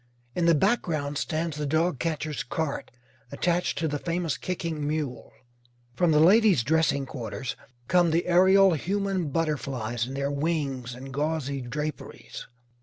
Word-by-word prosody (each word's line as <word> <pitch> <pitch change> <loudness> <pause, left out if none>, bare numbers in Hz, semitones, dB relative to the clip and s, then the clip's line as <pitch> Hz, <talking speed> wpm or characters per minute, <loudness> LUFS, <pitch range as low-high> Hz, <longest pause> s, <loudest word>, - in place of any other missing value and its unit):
In 170 -1 +1
the 170 - +6
background 150 - 0
stands 160 -1 -2
the 150 -1 -2
dogcatcher's 155 -3 -1
cart, 140 +5 -3 0.4
attached 175 +5 0
to 160 - 0
the 145 -1 -2
famous 170 -3 -1
kicking 165 -5 -3
mule. 150 -5 -3 0.6
From 175 +7 +2
the 150 - +4
ladies' 190 - +5
dressing 150 0 +2
quarters 120 -3 -5 0.3
come 175 -1 +4
the 165 +2 +1
aerial 190 +2 +5
human 190 0 -1
butterflies 135 -7 -2
in 135 - -6
their 140 +1 -1
wings 140 -5 -2
and 130 +1 -9
gauzy 145 -2 -1
draperies. 150 +5 -6
155 Hz, 135 wpm, -27 LUFS, 140-170 Hz, 0.6 s, the